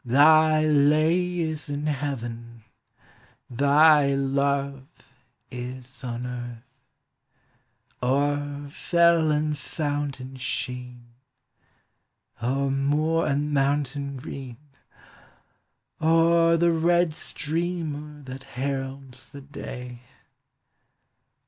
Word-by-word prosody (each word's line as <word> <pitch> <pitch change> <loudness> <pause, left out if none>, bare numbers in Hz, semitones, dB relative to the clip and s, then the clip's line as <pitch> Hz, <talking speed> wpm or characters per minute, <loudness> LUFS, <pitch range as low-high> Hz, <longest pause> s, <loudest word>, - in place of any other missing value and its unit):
Thy 155 +4 +5
lay 155 +4 +3
is 155 -3 -3
in 145 +1 -3
heaven, 120 -5 -4 0.9
thy 140 +2 +5
love 140 0 -1 0.6
is 125 +2 -7
on 120 0 -4
earth. 120 -2 -6 1.4
O'er 145 +2 0
fell 170 0 +3
and 150 0 +1
fountain 145 -3 -4
sheen, 125 -1 -5 1.4
O'er 135 +3 0
moor 150 +4 +1
and 145 +1 0
mountain 140 0 0
green, 130 -3 -8 1.4
O'er 165 +1 +4
the 170 +1 +3
red 170 0 +2
streamer 150 -2 -4
that 130 0 -8
heralds 135 0 -5
the 140 - -10
day. 125 -3 -8
140 Hz, 80 wpm, -25 LUFS, 130-155 Hz, 1.4 s, Thy